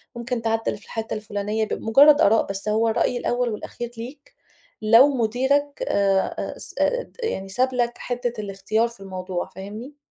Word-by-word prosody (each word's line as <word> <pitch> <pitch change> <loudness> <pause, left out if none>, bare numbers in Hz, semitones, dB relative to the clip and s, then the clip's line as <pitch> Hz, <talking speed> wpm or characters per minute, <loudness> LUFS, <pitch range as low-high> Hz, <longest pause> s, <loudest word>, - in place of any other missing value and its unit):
ممكن 235 0 -3
تعدّل 225 -1 -1
في 210 - -18
الحِتّة 225 0 -4
الفلانية؟" 210 +1 -2
ب - - -3
مجرّد 285 +7 +5
آراء، 225 -5 +4
بس 195 +1 -4
هو 220 +2 +2
الرأي 245 +2 +1
الأول 245 0 0
والأخير 235 +2 -6
ليك 265 +5 -10 0.5
لو 230 +5 +7
مديرك 265 - 0
آآ 195 -1 +1
س - - -6
آآ - - +2
ت - - -23
يعني 195 - -3
ساب 255 +5 +1
لك 240 -1 0
حِتّة 245 -1 -3
الاختيار 205 +3 0
في 235 -3 -14
الموضوع، 185 -2 -5
فاهمني؟ 215 +9 -8
225 Hz, 165 wpm, -23 LUFS, 205-250 Hz, 0.5 s, لو